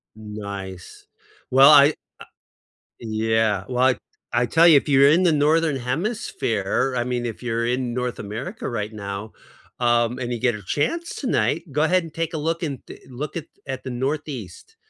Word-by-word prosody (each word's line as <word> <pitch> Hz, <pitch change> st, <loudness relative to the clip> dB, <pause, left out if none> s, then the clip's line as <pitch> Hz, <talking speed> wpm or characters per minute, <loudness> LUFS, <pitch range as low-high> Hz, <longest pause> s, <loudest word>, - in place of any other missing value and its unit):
Nice. 100 Hz, -4 st, -8 dB, 0.4 s
Well 135 Hz, +2 st, +7 dB
I, 145 Hz, -1 st, +8 dB
ah -, -, -3 dB, 1.1 s
Yeah, 110 Hz, -2 st, 0 dB
like, 125 Hz, 0 st, +2 dB, 0.4 s
I 120 Hz, +1 st, +2 dB
tell 165 Hz, +8 st, +5 dB
you, 165 Hz, -, +8 dB
if 140 Hz, -, -1 dB
you're 140 Hz, 0 st, +6 dB
in 170 Hz, +5 st, +4 dB
the 175 Hz, -, +4 dB
Northern 155 Hz, 0 st, +2 dB
Hemisphere, 130 Hz, -, -1 dB
I 120 Hz, -, +1 dB
mean, 125 Hz, -1 st, -2 dB
if 115 Hz, -2 st, -5 dB
you're 115 Hz, -1 st, -1 dB
in 125 Hz, 0 st, -1 dB
North 125 Hz, 0 st, -3 dB
America 115 Hz, -, -5 dB
right 105 Hz, -2 st, -3 dB
now, 100 Hz, 0 st, -6 dB, 0.5 s
um, 120 Hz, 0 st, +2 dB
and 125 Hz, -1 st, -3 dB
you 120 Hz, -, -4 dB
get 120 Hz, -2 st, +2 dB
a 105 Hz, -, -8 dB
chance 335 Hz, -, -2 dB
tonight, 165 Hz, -, -1 dB
go 150 Hz, +3 st, +1 dB
ahead 180 Hz, +3 st, +2 dB
and 165 Hz, -2 st, -10 dB
take 165 Hz, 0 st, -3 dB
a -, -, -2 dB
look 165 Hz, +3 st, -2 dB
in 140 Hz, -5 st, -4 dB
the -, -, -11 dB
look 140 Hz, +6 st, -5 dB
at 160 Hz, -, -5 dB, 0.2 s
at 130 Hz, -1 st, -5 dB
the 130 Hz, -, -5 dB
Northeast. 135 Hz, -, -5 dB
125 Hz, 175 wpm, -23 LUFS, 115-155 Hz, 1.1 s, I